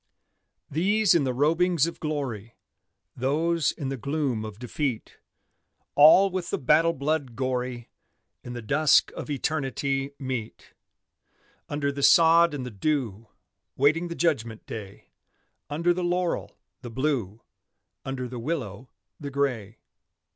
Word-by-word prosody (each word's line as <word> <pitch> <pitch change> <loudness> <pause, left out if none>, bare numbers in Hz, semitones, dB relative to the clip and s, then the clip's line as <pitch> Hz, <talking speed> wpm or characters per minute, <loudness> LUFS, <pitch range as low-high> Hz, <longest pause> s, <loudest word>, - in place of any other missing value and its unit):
These 200 +7 +3
in 160 -5 +2
the 130 - 0
robings 160 +4 +2
of 170 - -6
glory, 130 -8 -4 0.6
Those 155 +5 +1
in 140 -3 -5
the 135 - -3
gloom 140 -4 -2
of 110 -2 -8
defeat, 125 0 -4 0.7
All 170 +7 +7
with 180 -2 -3
the - - -1
battle 155 +5 +3
blood 140 -3 -2
gory, 125 -2 -3 0.5
In 120 - -7
the 120 -1 -6
dusk 150 +7 +3
of - - -8
eternity 135 -1 -1
meet: 130 -5 -6 1.0
Under 145 -1 -1
the 140 0 -6
sod 165 +1 +6
and 130 -3 -5
the 125 - -6
dew, 115 -2 -2 0.5
Waiting 155 +6 +2
the 170 - -6
judgment 115 -11 -1
day; 100 -3 -9 0.6
Under 170 +4 +1
the 180 +1 -3
laurel, 175 0 -1 0.2
the 125 - -7
Blue, 115 -5 -2 0.6
Under 130 -2 -4
the 125 0 -7
willow, 125 - -4 0.3
the 140 - -5
Gray. 125 -7 -2
140 Hz, 130 wpm, -26 LUFS, 125-160 Hz, 1.0 s, All